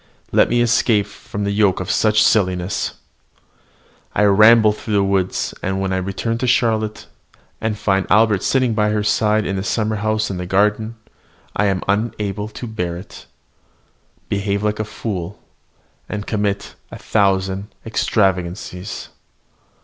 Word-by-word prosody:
Let - - +4
me 120 0 +3
escape 115 -3 +2
from 105 - -7
the 100 - 0
yoke 100 -2 +2
of 95 - -2
such 105 -1 +3
silly 95 -5 +3
subterfuges! 90 +2 -3 1.2
I 105 - +3
ramble 110 +2 +6
through 105 0 -4
the 100 - +3
woods; 95 -1 0
and 95 0 -2
when 95 -1 -1
I - - +1
return 100 +5 -2
to 125 - -1
Charlotte, 110 -3 +1 0.6
and 110 -1 -1
find 95 -2 0
Albert 105 -1 +4
sitting 130 -1 +1
by 105 -1 +1
her 105 0 0
side 105 0 +2
in 95 - -2
the 95 - -2
summer 110 0 -1
house 110 0 0
in 95 - -4
the 90 0 -5
garden, 105 +4 +1 0.6
I 105 - +2
am 95 -2 0
unable 105 0 -1
to 110 +3 -8
bear 90 -7 -3
it, 90 - -12 1.0
behave 100 0 -1
like 105 0 0
a 110 - -1
fool, 100 -3 -5 0.7
and 105 0 -4
commit 105 -2 -2 0.2
a - - -9
thousand 95 -1 0 0.2
extravagances. 95 -3 -1
105 Hz, 150 wpm, -19 LUFS, 95-110 Hz, 1.2 s, ramble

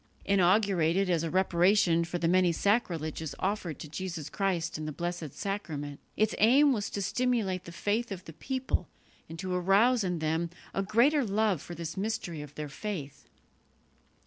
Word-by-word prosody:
Inaugurated 190 -2 +3
as 170 -2 +2
a 165 - -2
reparation 180 -1 +3
for 170 +1 -3
the 170 -1 0
many 180 0 +4
sacrileges 165 - -1
offered 190 -6 -2
to - - -8
Jesus 160 -2 -5
Christ 185 -4 -1
in 155 - -4
the - - -3
Blessed 175 -1 -4
Sacrament, 155 -8 -4 0.2
its 215 0 +2
aim 270 +6 +6
was 205 -4 -2
to 200 - -3
stimulate 220 -7 0
the 170 - -8
faith 210 +6 -1
of 185 -2 -6
the 160 - -10
people 260 - -2 0.4
and 165 - -7
to 185 +1 -3
arouse 200 +7 +4
in 180 -2 -1
them 160 +2 -1 0.2
a 195 - 0
greater 245 +9 +3
love 205 - +1
for 175 - -8
this 165 +1 -6
mystery 190 -6 -3
of 145 -1 -10
their 150 -1 -4
faith. 145 -1 -6
185 Hz, 170 wpm, -29 LUFS, 165-205 Hz, 0.4 s, aim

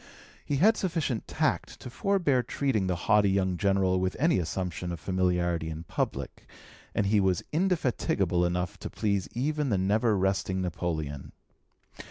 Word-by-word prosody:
He 145 - -1
had 215 +10 +4
sufficient 160 - -2
tact - - -1
to - - -9
forbear 175 -7 +1
treating 120 -5 -1
the 90 - 0
haughty 105 -2 +4
young 95 -1 +1
General 95 -1 +2
with 95 0 -1
any 165 - +3
assumption 90 +1 -3
of 85 - -5
familiarity 90 -3 0
in 80 +1 -6
public, - - -4 0.5
and 105 - +2
he 105 +1 +3
was 95 -3 +1
indefatigable 130 - +1
enough 90 0 -1
to - - -6
please 100 -3 -1
even 150 +3 -1
the 100 - +2
never 105 +3 +2
resting 95 0 0
Napoleon. 80 -5 -3
95 Hz, 150 wpm, -28 LUFS, 90-125 Hz, 0.5 s, had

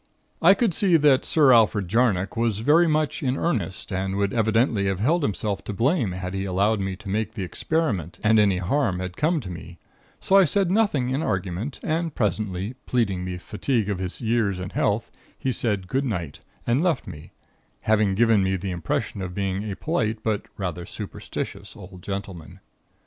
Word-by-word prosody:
"I 190 +4 +7
could 215 -3 +1
see 180 -1 +4
that 145 -4 +4
Sir 145 -5 +5
Alfred 105 -4 +4
Jarnock 105 -2 +1
was 115 -3 0
very 160 +8 +5
much 155 -2 0
in 130 -1 0
earnest, 100 - -2
and 95 0 -2
would 100 0 0
evidently 110 -2 +2
have 95 -1 -1
held 160 - +2
himself 100 -5 -2
to 105 - -4
blame 120 - +1
had 90 0 -5
he 95 0 -2
allowed 100 +3 +1
me 95 -1 -2
to 100 - -13
make 110 +2 -1
the 105 -4 -4
experiment 100 - -2
and 110 0 +5
any 100 -3 +3
harm 95 0 0 0.2
come 160 - +1
to 95 -6 -7
me; 85 0 -9 0.4
so 195 - +3
I 195 - +8
said 185 +2 +1
nothing 185 - +2
in 135 +3 0
argument; 95 - -3
and 165 0 -1
presently, 100 0 -1
pleading 100 -7 0
the 90 -1 -4
fatigue 110 +3 -1
of 100 -3 -2
his 95 +4 -4
years 110 -4 +1
and 90 0 -6
health, - - 0 0.3
he 130 - -1
said 105 -6 -1
goodnight, 100 - -2 0.3
and 120 +5 +2
left 170 -7 +1
me; 75 0 -10 0.5
having 105 -3 +2
given 115 -1 +4
me 95 0 +1
the 95 +1 -4
impression 95 +4 -3
of 90 -1 -5
being 100 +1 -2
a - - -4
polite 110 - -2
but 110 -2 -1
rather 90 -3 -3
superstitious, - - -6
old 90 0 -12
gentleman. 95 -4 -6
105 Hz, 180 wpm, -24 LUFS, 95-130 Hz, 0.5 s, I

